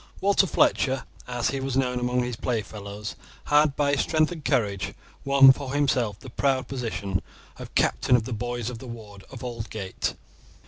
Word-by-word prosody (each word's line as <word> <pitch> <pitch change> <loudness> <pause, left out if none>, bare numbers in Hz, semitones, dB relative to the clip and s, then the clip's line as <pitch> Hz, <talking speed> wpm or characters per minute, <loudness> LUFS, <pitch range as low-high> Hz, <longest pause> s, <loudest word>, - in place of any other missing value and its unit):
Walter 200 0 +3
Fletcher, 135 -5 +2 0.2
as 120 -1 -1
he 135 - -2
was 135 -1 -2
known 125 -2 +1
among 125 0 +1
his 125 -1 -3
play 115 -1 -1
fellows, 100 0 -7 0.3
had 150 -1 +4
by 145 -1 +2
his 140 - +2
strength 155 0 +2
and 165 -4 -7
courage 100 -8 0 0.3
won 140 -1 +8
for 135 0 -3
himself 125 -8 +1
the 130 - -11
proud 130 0 +1
position 110 -7 -3 0.4
of - - -9
captain 125 - +3
of 120 - +2
the 120 - -4
boys 120 +1 -3
of 115 - -8
the 130 - -9
ward 105 -4 -10
of 130 -2 -9
Aldgate. 110 -5 -4
125 Hz, 180 wpm, -26 LUFS, 110-135 Hz, 0.4 s, won